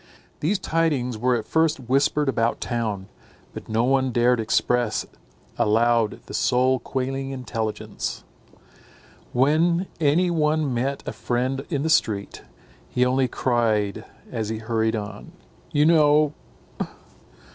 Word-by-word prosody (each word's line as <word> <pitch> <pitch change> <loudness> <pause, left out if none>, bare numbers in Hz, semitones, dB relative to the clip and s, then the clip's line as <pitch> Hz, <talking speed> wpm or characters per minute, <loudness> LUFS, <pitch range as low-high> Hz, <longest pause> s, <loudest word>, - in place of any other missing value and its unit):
These 185 +8 +1
tidings 155 - 0
were 125 +3 +1
at 110 -2 -3
first 160 +5 +2
whispered 140 +4 +1
about 115 -3 +1
town; 110 -5 -3 0.5
but - - -9
no 110 +1 +1
one 130 0 +2
dared 120 +1 +3
express 115 0 +1 0.5
aloud 115 0 +2
the - - -10
soul 130 +1 +2
quailing 135 +1 -3
intelligence. 115 -5 -4 1.1
When 160 +7 +2
any 165 +4 +3
one 155 -3 +1
met 135 +4 -2
a - - -3
friend 130 +2 -1
in 145 -5 -1
the 160 - 0
street, 105 -10 0 0.5
he 125 - +2
only 130 +1 +2
cried 115 -5 0 0.3
as 110 -2 -3
he 110 - -2
hurried 110 0 0
on, 105 - -7 0.4
"You 150 -2 +3
know!" 150 -2 +4
125 Hz, 125 wpm, -24 LUFS, 115-150 Hz, 1.1 s, know